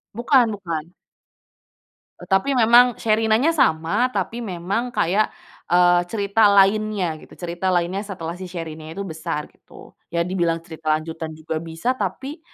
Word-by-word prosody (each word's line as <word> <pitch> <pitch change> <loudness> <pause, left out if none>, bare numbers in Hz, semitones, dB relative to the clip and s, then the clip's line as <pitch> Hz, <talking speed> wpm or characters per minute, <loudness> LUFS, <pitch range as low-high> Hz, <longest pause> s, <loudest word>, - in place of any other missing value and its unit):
Bukan 245 +1 +4
bukan. 165 -5 -5 1.4
Tapi 195 +8 +1
memang 240 +1 +6
Sherinanya 225 +6 +2
sama, 170 - +2
tapi 230 0 -3
memang 200 +2 -3
kayak, 200 +6 +2 0.4
eee, 175 0 +5
cerita 205 +2 +2
lainnya 200 -4 +2
gitu. - - -16
Cerita 175 +1 -4
lainnya 175 +2 0
setelah 175 -3 -6
si 185 - -6
Sherinanya 160 -2 -7
itu 200 - -4
besar 160 -4 -5
gitu. - - -16 0.2
Ya, 170 0 -1
dibilang 170 -2 -1
cerita 160 -2 -1
lanjutan 160 0 -6
juga 155 0 -4
bisa 165 +8 -2
tapi, 270 +3 -4
185 Hz, 135 wpm, -22 LUFS, 165-220 Hz, 1.4 s, memang